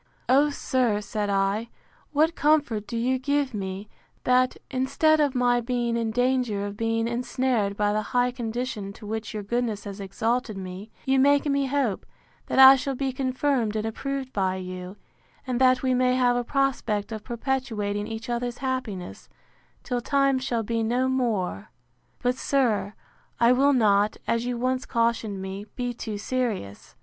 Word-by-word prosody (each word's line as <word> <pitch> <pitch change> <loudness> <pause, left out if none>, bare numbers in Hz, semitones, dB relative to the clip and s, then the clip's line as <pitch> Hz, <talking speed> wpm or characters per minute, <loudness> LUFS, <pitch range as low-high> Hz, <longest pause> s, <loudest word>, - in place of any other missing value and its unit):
O, 280 +3 +5
sir, 255 -6 0
said 210 0 -3
I, 200 +3 0 0.4
what 310 +3 +3
comfort 290 -10 +1
do 235 - -4
you 255 +3 +1
give 285 0 0
me, 195 0 -5 0.4
that, 255 0 +3
instead 280 +4 +2
of 285 -3 +2
my 245 -1 +3
being 240 -1 -1
in 230 -1 0
danger 245 -3 0
of 205 0 -5
being 225 +1 0
ensnared 240 -3 -1
by 205 0 +1
the 215 - +1
high 245 +3 +1
condition 235 -4 -4
to 210 - -12
which 220 0 -4
your 210 - -3
goodness 225 -1 -2
has 200 0 -7
exalted 220 +3 -2
me, 190 +3 -7 0.2
you 265 0 +3
make 285 +2 +4
me 280 -1 +1
hope, 260 -7 -1 0.4
that - - -2
I 265 0 +10
shall 270 +1 -3
be 265 0 -2
confirmed 255 -3 0
and 215 0 -1
approved 270 +3 -4
by 190 -2 0
you; 185 +1 -7 0.5
and 255 -1 -2
that 255 0 +4
we 260 -1 +2
may 250 0 +3
have 250 -1 +3
a 245 - 0
prospect 235 -6 -1
of 215 -1 -5
perpetuating 225 -5 -2
each 225 +2 -6
other's 240 0 -2
happiness, 255 -9 -4 0.5
till 245 -2 -2
time 275 +1 +2
shall 235 -3 -1
be 230 +1 -1
no 245 +3 +1
more!—But, 200 - -3
sir, 220 -8 0 0.4
I 235 +1 +5
will 275 +3 +4
not, 210 -4 +3
as 230 +1 0
you 245 -1 -2
once 255 +1 -1
cautioned 225 -4 0
me, 195 +2 -6
be 245 -1 -2
too 220 -3 -5
serious. 210 - -3
240 Hz, 165 wpm, -25 LUFS, 210-260 Hz, 0.5 s, I